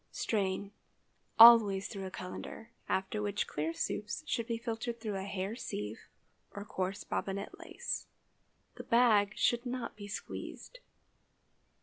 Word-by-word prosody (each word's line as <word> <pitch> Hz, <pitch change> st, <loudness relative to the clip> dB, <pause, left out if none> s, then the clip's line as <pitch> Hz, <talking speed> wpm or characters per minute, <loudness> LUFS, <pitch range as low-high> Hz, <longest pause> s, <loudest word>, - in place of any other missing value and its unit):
Strain—always 205 Hz, +1 st, +4 dB
through 195 Hz, -2 st, -6 dB
a -, -, -5 dB
cullender, 185 Hz, +4 st, -7 dB, 0.2 s
after 190 Hz, +3 st, -1 dB
which 205 Hz, 0 st, -1 dB
clear 155 Hz, +2 st, -2 dB
soups 210 Hz, -, -3 dB
should 235 Hz, -8 st, -1 dB
be 230 Hz, -2 st, -1 dB
filtered 230 Hz, 0 st, -4 dB
through 215 Hz, -3 st, -3 dB
a 190 Hz, -, -4 dB
hair 195 Hz, +2 st, -3 dB
sieve 105 Hz, -, -5 dB, 0.5 s
or 200 Hz, 0 st, -6 dB
coarse 190 Hz, 0 st, -3 dB
bobbinet 200 Hz, +1 st, -4 dB
lace. -, -, -4 dB, 0.7 s
The -, -, -6 dB
bag 220 Hz, -4 st, +4 dB
should 240 Hz, 0 st, +2 dB
not 250 Hz, -1 st, -4 dB
be 205 Hz, -1 st, -8 dB
squeezed. -, -, -7 dB
205 Hz, 125 wpm, -33 LUFS, 195-230 Hz, 0.7 s, Strain—always